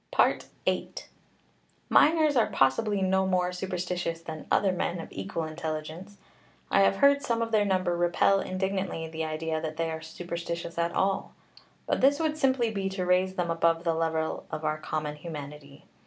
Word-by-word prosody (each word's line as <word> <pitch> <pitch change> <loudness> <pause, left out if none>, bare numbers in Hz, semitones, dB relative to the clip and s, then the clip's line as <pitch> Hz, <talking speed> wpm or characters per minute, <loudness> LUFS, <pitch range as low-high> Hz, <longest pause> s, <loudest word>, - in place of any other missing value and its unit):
VIII. - - -1 0.9
Miners 310 -1 +4
are 235 - +4
possibly 195 +10 +2
no 190 0 +2
more 180 -1 +1
superstitious 180 -2 -3
than 160 -2 -8
other 195 - +3
men 175 -1 -2
of 165 - -7
equal 95 +12 -4
intelligence; 160 +4 -5 0.5
I 195 - +5
have 195 - +4
heard 280 +6 +5
some 235 -4 0
of 225 - -4
their 210 -2 +3
number 185 -3 +1
repel 175 +3 +3
indignantly 190 -3 -2
the 160 0 -4
idea 155 0 -2
that 155 0 -5
they 165 -1 -1
are 160 0 -5
superstitious 170 +1 -5
at 170 0 +1
all; 195 0 0 0.5
but - - 0
this 280 +2 +4
would 315 -2 0
simply 260 -6 +2
be 195 -2 -2
to 190 -1 -3
raise 185 +1 +2
them 175 -2 -1
above 165 0 +2
the 165 -2 +1
level 160 -1 -1
of 155 - -5
our 155 0 0
common 155 -1 -3
humanity. 150 0 -9
175 Hz, 170 wpm, -28 LUFS, 160-195 Hz, 0.9 s, I